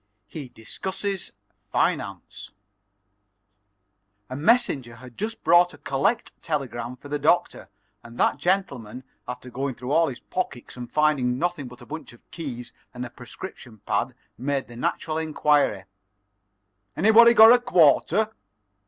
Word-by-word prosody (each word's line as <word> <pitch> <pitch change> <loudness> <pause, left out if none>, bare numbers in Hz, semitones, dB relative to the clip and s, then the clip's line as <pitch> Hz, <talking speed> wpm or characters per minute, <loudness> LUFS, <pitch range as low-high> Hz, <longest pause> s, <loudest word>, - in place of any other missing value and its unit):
IV - - -27
HE 145 -6 -6
DISCUSSES 190 - -4 0.4
FINANCE - - -2 1.8
A - - -3
messenger 145 - +2
had 125 0 -13
just 220 +2 -5
brought 175 +2 +5
a - - -17
"collect" 140 - 0
telegram 125 -6 -3
for 135 - -13
the 145 +1 -2
Doctor, - - +1 0.3
and 115 0 -13
that 130 - +2
gentleman, 135 - -1 0.2
after 125 0 -7
going 135 +1 -3
through 125 +3 -6
all 165 +2 +4
his 125 -4 -6
pockets, 150 -9 -5
and 125 -1 -8
finding 145 -5 +2
nothing 170 -3 -2
but 125 0 -13
a - - -11
bunch 155 -3 -8
of 120 - -22
keys 130 -8 -6 0.2
and 125 0 -4
a 120 - -9
prescription 125 -2 -10
pad, 125 +1 -1 0.2
made 135 +1 -1
the 120 - -12
natural 155 +6 -2
inquiry: 150 -9 +1 1.1
"Anybody 225 +5 +7
got 225 +1 +10
a 245 - +5
quarter?" 200 - +3
145 Hz, 140 wpm, -25 LUFS, 125-175 Hz, 1.8 s, got